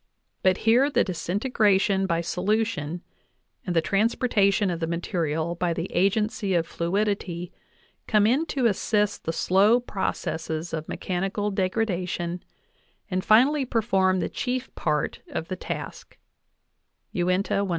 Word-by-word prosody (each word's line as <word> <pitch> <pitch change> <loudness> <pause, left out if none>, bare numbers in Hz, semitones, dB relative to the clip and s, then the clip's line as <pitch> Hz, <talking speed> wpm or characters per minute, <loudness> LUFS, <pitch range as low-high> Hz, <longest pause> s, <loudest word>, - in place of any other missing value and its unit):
but 185 -1 +3
here 245 +5 +5
the - - +3
disintegration 195 +1 +1
by 170 -2 +1
solution 180 -3 -1 0.6
and 175 - -1
the 165 - +3
transportation 205 -1 +2
of 170 - -3
the 165 - -2
material 165 -1 -1
by 175 0 -1
the 165 +1 -3
agency 200 +1 +1
of 165 -1 +2
fluidity 180 0 -2 0.6
come 210 -2 +4
in 255 +8 +3
to 265 -5 -1
assist 210 -1 +1
the 165 - 0
slow 200 +8 +4
processes 165 -7 -3
of 155 -1 -4
me - - -4
chanical 195 +3 -2
degradation, 180 -3 -1 0.7
and 185 0 0
finally 265 +8 +5
perform 195 -6 +1
the - - -1
chief 255 0 -3
part 150 -2 -1
of 165 - -4
the 185 - -2
task"_J\Uinta, - - -7 1.5
196). 195 - -3
190 Hz, 130 wpm, -25 LUFS, 175-215 Hz, 1.5 s, here